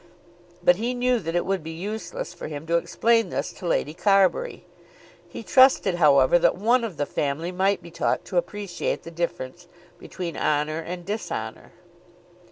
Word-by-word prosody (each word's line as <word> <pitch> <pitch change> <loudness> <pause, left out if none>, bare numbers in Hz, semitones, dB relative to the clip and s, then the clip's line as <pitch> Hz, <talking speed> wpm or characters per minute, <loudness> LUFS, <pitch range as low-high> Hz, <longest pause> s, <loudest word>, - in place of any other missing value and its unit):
But 180 0 +5
he 240 +4 -2
knew 250 0 +2
that 165 -3 -4
it 175 - +1
would 195 -1 -1
be 160 - -7
useless 215 - -5
for - - -7
him 150 0 -7
to 170 +1 +2
explain 230 +6 +2
this - - -3
to 180 - -7
Lady 150 -2 0
Carbury. 195 - +2 0.6
He - - -8
trusted, 260 -8 +5
however, 150 -2 +5
that - - +3
one 235 +6 +2
of 205 -9 -5
the 145 - 0
family 150 +6 -2
might 190 0 +1
be 170 - -11
taught 170 - -1
to 185 - -3
appreciate 205 - -2
the - - -9
difference - - -4 0.3
between 175 -3 -6
honour 150 +1 0
and 175 +2 -6
dishonour. 210 +2 -5
180 Hz, 170 wpm, -24 LUFS, 165-225 Hz, 0.6 s, But